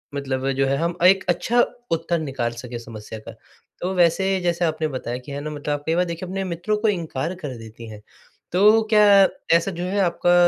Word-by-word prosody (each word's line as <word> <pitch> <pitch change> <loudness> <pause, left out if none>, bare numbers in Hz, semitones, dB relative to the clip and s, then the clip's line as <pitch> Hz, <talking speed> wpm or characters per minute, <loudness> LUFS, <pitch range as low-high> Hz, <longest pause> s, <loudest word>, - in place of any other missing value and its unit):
मतलब 135 -1 -2
जो 135 0 +1
है 135 - +1
हम 170 +2 -1
एक 190 +1 +6
अच्छा 225 +8 +2 0.3
उत्तर 165 +1 0
निकाल 130 -6 -2
सके 120 -1 -7
समस्या 110 -1 -9
का। - - -10 0.5
तो 185 +2 -1
वैसे 185 +2 +2
जैसे 175 0 0
आपने 155 0 -1
बताया 125 -3 -4
कि 130 +3 -11
है 140 - -4
ना 155 - -5
मतलब 150 0 -3
आप 145 0 -4
कई 165 +1 +1
बार 180 +1 +2
देखिए 170 +2 -5
अपने 195 +1 -3
मित्रों 180 +4 -2
को 220 +1 0
इनकार 165 -4 -2
कर 145 -8 -7
देती 115 +1 -11
हैं, 105 -1 -10 0.5
तो 210 +5 +5
क्या 205 -2 +7 0.3
ऐसा 180 +4 -2
जो 175 0 -5
है 195 +3 -1
आपका 175 -1 +2
170 Hz, 210 wpm, -22 LUFS, 135-185 Hz, 0.5 s, क्या